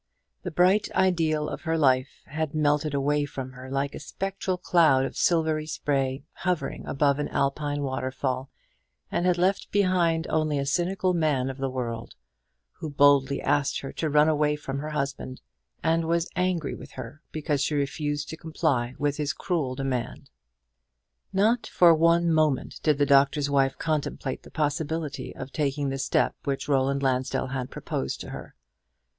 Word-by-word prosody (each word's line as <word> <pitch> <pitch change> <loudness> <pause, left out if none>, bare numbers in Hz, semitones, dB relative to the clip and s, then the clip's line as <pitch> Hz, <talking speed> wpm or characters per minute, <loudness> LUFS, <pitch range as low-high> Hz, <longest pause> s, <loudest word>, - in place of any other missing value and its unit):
The 180 - -4
bright 180 +5 +3
ideal 165 -5 +2
of - - -5
her 165 -1 0
life 130 -3 +2
had 155 +1 -3
melted 150 -1 +1
away 145 +1 +1
from 130 -2 -6
her 130 0 -10
like 135 +1 -1
a - - -6
spectral 190 +3 -3
cloud 160 -8 +4
of - - -6
silvery 160 -2 +1
spray 135 -3 -1
hovering 180 -3 -2
above 140 0 +2
an 145 - -1
Alpine 145 +1 -1
waterfall, 130 0 -2 0.6
and 175 - +1
had 180 -1 +3
left 185 +3 +1
behind 180 -5 +2
only 155 -2 +1
a 140 - -1
cynical 180 +6 +1
man 145 -6 +1
of 135 - -11
the 135 0 -1
world, 120 -3 -4 0.6
who 155 - -4
boldly 140 -1 +4
asked 140 -1 +1
her 135 - -6
to 160 - -2
run 150 +1 +5
away 150 -1 +2
from 140 -2 -5
her 150 +2 -4
husband, 140 -3 -3 0.4
and 165 0 +2
was 170 +1 0
angry 180 -4 0
with - - -10
her 130 +4 -8
because 150 -2 -1
she 150 +1 0
refused 145 +1 -2
to 160 - -5
comply 130 -6 -1
with 145 0 0
his 150 -1 -1
cruel 145 -5 -2
demand. 130 -3 -3 1.0
Not 220 +5 +2
for 175 -2 +6
one 170 +1 +3
moment 155 -4 +1
did 150 -3 +2
the 145 - +3
Doctor's 140 +1 +3
Wife 135 -1 +2
contemplate 150 -4 -2
the - - -14
possibility 150 -2 -2
of 135 - -7
taking 145 -1 -1
the 135 0 -3
step - - +1
which 135 -1 -2
Roland 140 0 +1
Lansdell 130 0 0
had 130 -2 -3
proposed 65 - -4
to - - -7
her. - - -9
145 Hz, 165 wpm, -26 LUFS, 135-160 Hz, 1.0 s, for